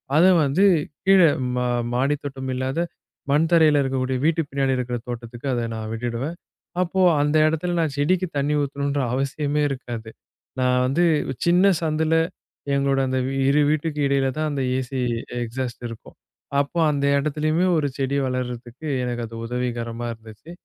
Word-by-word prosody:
அத 165 +3 +6 0.2
வந்து 145 +8 +3 0.4
கீழ 195 0 +7 0.4
மா 125 0 0 0.3
மாடித் 140 +4 +1
தோட்டம் 130 -2 -5
இல்லாத 130 +4 -2 0.5
மண் 150 +3 +3
தரையில 155 -3 +5
இருக்கக்கூடிய 130 -1 -1
வீட்டு 165 +1 +2
பின்னாடி 135 -1 0
இருக்கிற 125 -1 -2
தோட்டத்துக்கு 120 +1 -7
அத 120 - 0
நான் 110 -1 -5
விட்டுடுவேன். 120 +7 -3 0.5
அப்போ 185 +1 0 0.2
அந்த 145 +1 +1
இடத்துல 160 +3 -1
நான் 160 -4 0
செடிக்கு 180 +6 +1
தண்ணி 140 +1 +1
ஊத்தணும்னுற 140 0 -1
அவசியமே 140 +3 -1
இருக்காது. 120 -4 -6 0.5
நான் 125 0 +2
வந்து 140 +7 +1 0.4
சின்னச் 180 +1 +4
சந்துல 160 0 +1 0.6
எங்களோட 140 0 +1
அந்த 130 0 0 0.3
இரு 145 +2 +4
வீட்டுக்கு 155 0 -1
இடையில 135 -1 +2
தான் 155 0 0
அந்த 140 -1 -2 0.2
ஏசி 130 +1 -4 0.4
எக்ஸாஸ்ட் 120 +1 -5
இருக்கும். 115 - -11 0.4
அப்போ 140 +4 -1
அந்த 140 -1 -1
இடத்துலயுமே 155 +4 0
ஒரு 150 -2 +1
செடி 140 0 0
வளர்றதுக்கு 125 +2 -5 0.2
எனக்கு 120 -1 -3
அது 115 - -10
உதவிகரமா 120 -1 -3
இருந்துச்சு. 110 +7 -13
140 Hz, 145 wpm, -23 LUFS, 125-155 Hz, 0.6 s, கீழ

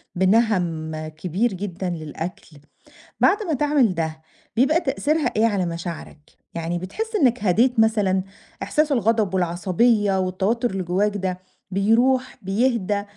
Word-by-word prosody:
بِنَهم 175 -6 +1
كبير 180 +8 -2
جدًا 185 -1 -4
للأكل، 160 -1 -7 0.6
بعد 415 +3 +3
ما 330 -5 -2
تعمل 280 -8 +2
ده 160 -1 -3 0.3
بيبقى 275 +8 +3
تأثيرها 300 +2 0
إيه 220 - +3
على 200 -5 +1
مشاعرك، 170 -2 -6 0.3
يعني 170 +1 -3
بتحس 440 - -5
إنك 250 - +2
هديت 230 +6 +3
مثلًا؟ 205 -4 +2 0.4
إحساس 305 0 +1
الغضب 225 -5 +1
والعصبية 190 +4 +2
والتوتر 195 +6 0
اللي 190 -1 -3
جواك 200 +4 0
ده 185 -2 -3 0.3
بيروح؟ 240 +7 +2
بيهدى؟ 205 0 0
200 Hz, 125 wpm, -22 LUFS, 180-240 Hz, 0.6 s, بعد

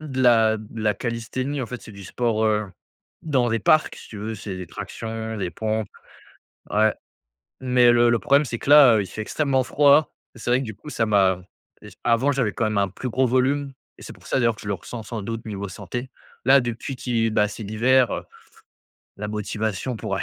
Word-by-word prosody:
de 135 -4 -4
la 115 -3 +5
de 110 +1 -9
la 105 -1 +3
callisthénie. 130 +5 -3
En - - -4
fait, 125 0 -7
c'est 110 - -12
du 100 0 -11
sport, 110 +2 -1
heu, 105 -1 +1 0.6
dans 130 -6 +1
les 115 -1 0
parcs, 155 +8 +3
si - - -13
tu 105 - -9
veux, 110 +2 -4
c'est 95 -2 -6
des 90 - -7
tractions, 110 +4 -6
des 95 -4 -3
pompes. 110 +1 -2 0.8
Ouais. 110 +1 +3 0.7
Mais 125 -2 +4
le 120 0 +4
le 120 -1 +3
problème, 140 +2 +3
c'est 120 - -4
que 140 - -4
là, 145 -5 +9
heu, 105 - +2
il - - -6
fait 110 - -8
extrêmement 135 +3 0
froid. 145 +3 +4 0.2
Et - - -14
c'est 115 - -6
vrai 125 +2 +3
que, - - -3
du 110 -4 -7
coup, 150 - -14
ça 115 -6 0
m'a 95 -4 +2 0.4
et - - -11
c - - -19
avant, 120 +4 +2
j'avais 125 -6 0
quand 115 - -1
même 110 -1 0
un 100 -1 +2
plus 120 +7 -6
gros 130 +3 +2
volume 135 +3 +1 0.3
et - - -13
c'est - - -9
pour - - -18
ça, - - 0
d'ailleurs, 115 -2 +2
que - - -12
je 105 - -7
le 100 - 0
ressens, 110 +6 -8
sans 115 0 -5
doute, 115 +2 -5
niveau 100 -2 -5
santé. 115 +7 -6 0.4
Là, 135 0 +7
depuis 120 +3 -5
qu'il 115 -3 0
bah, 105 -1 +3
c'est 110 +2 -8
l'hiver, 120 +4 +3
heu, - - -4 0.9
la 105 +1 -5
motivation 105 +2 -3
pourrait - - -3
115 Hz, 225 wpm, -23 LUFS, 105-130 Hz, 0.9 s, là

